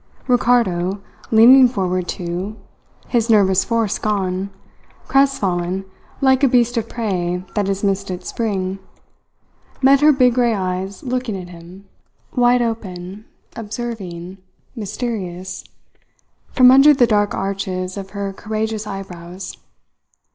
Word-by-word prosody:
Ricardo, 210 -7 +2 0.3
leaning 250 +4 +7
forward 185 -6 -2
too, 180 +4 -4 0.5
his 235 -2 +1
nervous 195 -4 +4
force 230 -3 -1
gone, 195 -2 -1 0.6
crestfallen 195 -9 +1 0.4
like 265 0 +3
a - - +7
beast 240 -1 +2
of 230 -1 -2
prey 180 -6 -2
that 205 -2 0
has 195 0 -2
missed 195 -1 0
its 180 0 -6
spring, 195 -4 -2 1.0
met 275 +1 +5
her 305 +1 +7
big 255 -3 +3
grey 240 -2 +2
eyes 185 0 -4
looking 250 -6 -3
at 180 -1 -9
him 175 +3 -13 0.5
wide 245 -1 +4
open, 200 -3 -5 0.3
observing, 205 -6 -6 0.4
mysterious 200 -5 -5 0.9
from 255 -1 +6
under 280 +3 +7
the 250 - +5
dark 205 -2 +1
arches 190 -1 -3
of 195 -1 -7
her 200 -1 -5
courageous 215 +1 -4
eyebrows. 185 -1 -8
205 Hz, 120 wpm, -19 LUFS, 185-240 Hz, 1.0 s, leaning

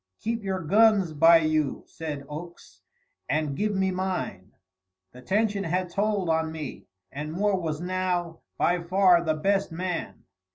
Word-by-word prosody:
"Keep 230 0 -3
your 190 -1 -2
guns 200 0 +4
by 165 +3 +7
you," 155 -3 0
said 150 -3 -6
Oakes, 170 +4 -10 0.5
"and 150 -2 0
give 210 +5 -1
me 190 0 +1
mine." 180 - -3 0.6
The 125 - -13
tension 200 - 0
had 180 +1 -1
told 205 -1 0
on 160 0 +1
me, 155 -4 -7 0.2
and 150 +2 -5
Moore 195 +3 +1
was 155 -3 -3
now 180 -2 -2 0.2
by 175 +1 +2
far 180 0 +4
the 155 -2 0
best 195 +4 0
man. 180 +1 -4
175 Hz, 150 wpm, -26 LUFS, 155-190 Hz, 0.6 s, by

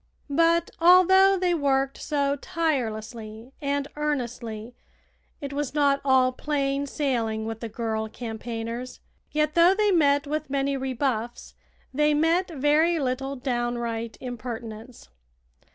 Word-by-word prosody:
But, 335 +3 +3
although 375 +3 +6
they 360 -1 +1
worked 275 -3 0
so 280 -2 0
tirelessly 230 -6 -3
and 280 0 -1
earnestly, 240 -6 -3 0.7
it 280 -1 -5
was 290 0 -3
not 280 -1 +3
all 260 -2 +4
plain 280 0 -1
sailing 230 -7 -1
with 225 0 -5
the 230 - -5
girl 220 -1 -3
campaigners. 230 +1 -6 0.3
Yet 305 0 0
though 345 +3 +5
they 420 0 +2
met 285 -5 +3
with 305 +1 -3
many 275 0 0
rebuffs, 260 -3 -3 0.4
they 300 +2 +3
met 330 +5 +2
very 310 +3 +2
little 270 -1 -2
downright 240 -3 -3
impertinence. 235 -1 -7
275 Hz, 120 wpm, -25 LUFS, 235-300 Hz, 0.7 s, although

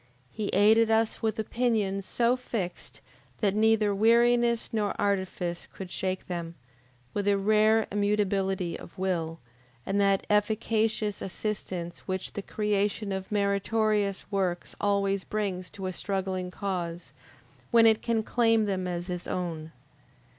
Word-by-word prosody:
He 215 -2 -3
aided 220 +4 +5
us 225 0 +1
with 220 -2 0
opinions 215 -4 0
so 240 +1 +2
fixed 225 -8 -5 0.4
that 200 -3 +2
neither 215 -1 +3
weariness 235 +2 +3
nor 210 -2 -1
artifice 190 -3 -1
could 190 -2 -8
shake 185 0 -2
them, 170 -2 -5 0.6
with 205 -1 -1
a 200 -1 +4
rare 215 +2 +4
immutability 195 -3 0
of - - -13
will, 170 -4 -1 0.5
and 200 +1 +1
that 195 -1 +2
efficacious 215 0 +1
assistance 185 -3 -4
which 185 -1 -3
the 205 - -4
creation 210 0 -1
of 190 +1 -4
meritorious 205 0 +1
works 185 -3 -1
always 200 -1 +1
brings 190 -4 -3
to 195 - -7
a 185 - -2
struggling 190 -1 -2
cause, 180 -3 -4 0.6
when 230 -2 +6
it 220 -1 +5
can 230 -2 0
claim 225 -1 +3
them 190 -2 -1
as 175 0 -3
its 180 -1 -4
own. 165 -3 -4
200 Hz, 130 wpm, -28 LUFS, 185-215 Hz, 0.6 s, when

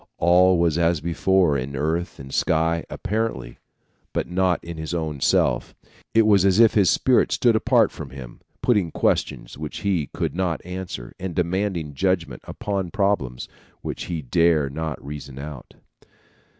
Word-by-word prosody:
All 90 +2 +5
was 85 -1 +2
as 85 -1 +2
before 85 0 +2
in 70 +1 -3
earth 80 +5 -2
and 65 0 -10
sky, 80 +1 +1
apparently, 110 - -3 0.5
but - - -1
not 90 0 +1
in 85 -1 -7
his 80 +2 -4
own 80 -4 -3
self. - - +1 0.4
It 115 - +6
was 100 -3 +5
as 95 +1 +3
if 115 -2 +6
his 100 -4 +4
spirit 130 -2 +3
stood 120 -2 +3
apart 115 -1 +3
from 75 -4 -8
him, 65 -2 -10 0.2
putting 105 -8 +2
questions 75 - -1
which 75 -1 -6
he 90 -8 0
could - - -3
not 90 -3 -2
answer, 90 -9 -6
and 95 -2 -5
demanding 90 -3 -1
judgment 85 -5 -1
upon 100 -3 -3
problems 85 -12 -1 0.3
which - - -5
he 85 -4 -4
dare 80 0 +2
not 80 -1 -4
reason 70 -2 -8
out. 70 -2 -9
85 Hz, 155 wpm, -23 LUFS, 75-95 Hz, 0.5 s, It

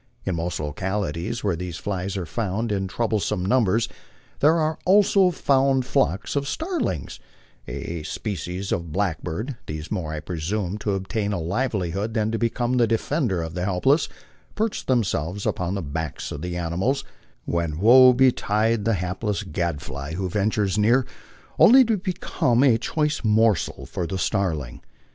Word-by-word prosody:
In 95 - 0
most 85 +1 -2
localities 90 +5 -3
where 100 -4 +1
these 90 -1 -5
flies 95 0 -3
are 90 - -3
found 110 +4 -2
in 95 -2 -1
troublesome 105 -2 -1
numbers, 115 0 +2 0.5
there 155 +3 +5
are 155 -1 0
also 195 0 +5
found 135 -5 +2
flocks 95 - 0
of 140 0 0
starlings, 320 - -3 0.5
a 85 -1 -5
spe 105 +7 -4
cies 90 +2 -5
of 85 -2 -2
blackbird; 100 - -2
these, 75 +1 -6
more, 90 -7 -2
I 80 - -3
presume, 90 +5 -3
to 105 -1 -1
obtain 100 +2 -2
a 100 - -1
livelihood 100 +2 -2
than 110 -1 +1
to 115 - -1
become 120 +2 0
the 120 -2 +4
defender 115 - 0
of 80 0 -6
the 90 0 -3
helpless, 120 - +2 0.5
perch 220 0 -2
themselves 100 - 0
upon 90 +2 -1
the 95 - -3
backs 75 0 -4
of 70 - -5
the 90 0 -4
animals, 95 +12 -1 0.4
when 85 -3 -1
woe 125 +7 +8
betide 115 -4 +2
the 115 -1 +2
hapless 95 +3 -2
gadfly 75 -5 -4
who 95 +1 -2
ventures 100 +1 0
near, 120 +5 +4 0.5
only 260 +3 +8
to 225 -1 +2
become 175 - 0
a 120 -5 +4
choice 150 +3 -1
morsel 110 -2 +2
for 85 - -4
the 95 - -3
starling. 85 - -1
100 Hz, 155 wpm, -24 LUFS, 90-120 Hz, 0.5 s, woe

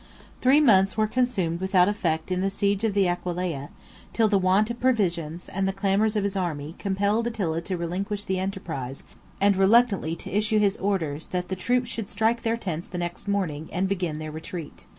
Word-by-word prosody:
Three 265 +4 +5
months 195 -8 +4
were 215 - +3
consumed 210 -8 0
without 190 -1 +4
effect 170 -5 -1
in 185 0 0
the 195 - +1
siege 200 +1 0
of 215 -3 0
the 195 -2 +4
Aquileia; 175 -4 -2 0.4
till 225 -1 +3
the 205 -2 +3
want 190 +4 +3
of 235 - -6
provisions, 175 -9 0
and 195 0 -1
the - - +1
clamors 200 +2 +1
of 210 - +1
his 200 0 -1
army, 160 -5 -3
compelled 205 +3 0
Attila 180 -8 -1
to 185 +2 -3
relinquish 195 +5 -3
the 190 -1 -1
enterprise; 165 -9 -4 0.4
and 200 0 +4
reluctantly 195 -4 +3
to 175 - -7
issue 215 +1 +2
his 205 -1 +3
orders, 165 -7 -2
that 180 -1 -3
the 190 - -1
troops 245 +5 0
should 225 -4 -4
strike 225 +1 +1
their 230 0 0
tents 175 -7 -4
the 180 - -6
next 175 +3 -4
morning, 170 -7 -1
and 185 +2 0
begin 180 -5 -2
their 155 0 -5
retreat. 160 0 -8
190 Hz, 195 wpm, -25 LUFS, 175-210 Hz, 0.4 s, Three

